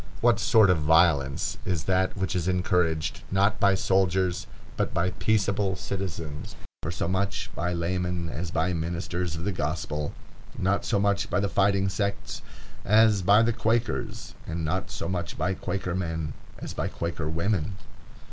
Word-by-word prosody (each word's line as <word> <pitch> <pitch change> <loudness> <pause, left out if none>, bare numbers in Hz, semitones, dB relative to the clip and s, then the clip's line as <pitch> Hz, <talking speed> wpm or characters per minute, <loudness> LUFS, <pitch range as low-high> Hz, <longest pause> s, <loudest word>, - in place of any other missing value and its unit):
What 120 -3 +4
sort 110 -3 +5
of 90 - +2
violence 75 -3 +3
is 90 -5 -1
that 95 +2 +1
which 95 -1 -1
is 90 -1 0
encouraged, 90 -4 +1
not 100 +2 +2
by 100 -1 +4
soldiers, 95 -1 +1 0.3
but - - -1
by 90 +2 +1
peaceable 100 -2 +1
citizens, 85 -6 -5 0.3
not 80 - -2
so - - -1
much 100 +2 -1
by 90 +1 -1
laymen 90 0 -1
as 85 +2 -4
by 90 +2 0
ministers 85 +1 -2
of 80 - -5
the 100 - 0
gospel, 75 -2 -2 0.5
not 100 +2 +1
so 105 - +1
much 100 +2 +1
by 90 - +1
the 100 - +1
fighting 100 0 +2
sects 100 +1 -2 0.4
as 105 -1 +5
by 100 +4 +6
the 115 0 +2
Quakers, 115 +1 -1
and 80 0 -3
not 80 - -1
so - - -4
much 90 -2 -3
by 90 +5 0
Quaker 90 -1 -3
men 80 -4 -2 0.2
as - - -6
by - - -2
Quaker 85 -2 -3
women? 90 +3 0
90 Hz, 160 wpm, -27 LUFS, 85-100 Hz, 0.5 s, by